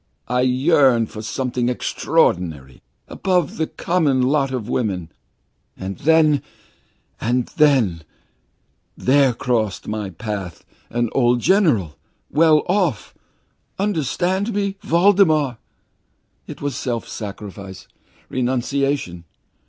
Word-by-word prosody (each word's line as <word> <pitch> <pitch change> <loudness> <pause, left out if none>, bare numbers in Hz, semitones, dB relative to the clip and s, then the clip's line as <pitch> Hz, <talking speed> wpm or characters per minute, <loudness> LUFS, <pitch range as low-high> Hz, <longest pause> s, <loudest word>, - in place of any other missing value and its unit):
I 125 +1 +1
yearned 130 -3 +3
for 110 - -7
something 125 +2 -2
extraordinary, 80 - 0 0.3
above 180 -5 -1
the 160 - 0
common 150 -7 +1
lot 135 +1 +2
of 125 -5 -4
woman! 95 -10 -2 0.7
And 95 0 -6
then 155 -2 +4 0.8
and 120 +1 0
then 130 - +3 1.0
there 135 0 +3
crossed 115 -5 -1
my 105 -2 -3
path 95 -2 -6 0.2
an 120 -1 -1
old 120 -2 +2
general 145 - +2 0.3
very 145 - -2
well 155 -2 +5
off. 180 - 0 0.6
Understand 190 - -1
me, 200 -1 -1
Voldemar! 165 - +3 0.9
It - - -9
was 145 -3 -2
self 120 -3 -3
sacrifice, 100 -3 -8 0.4
renunciation! 130 -7 -1
125 Hz, 100 wpm, -20 LUFS, 110-155 Hz, 1.0 s, well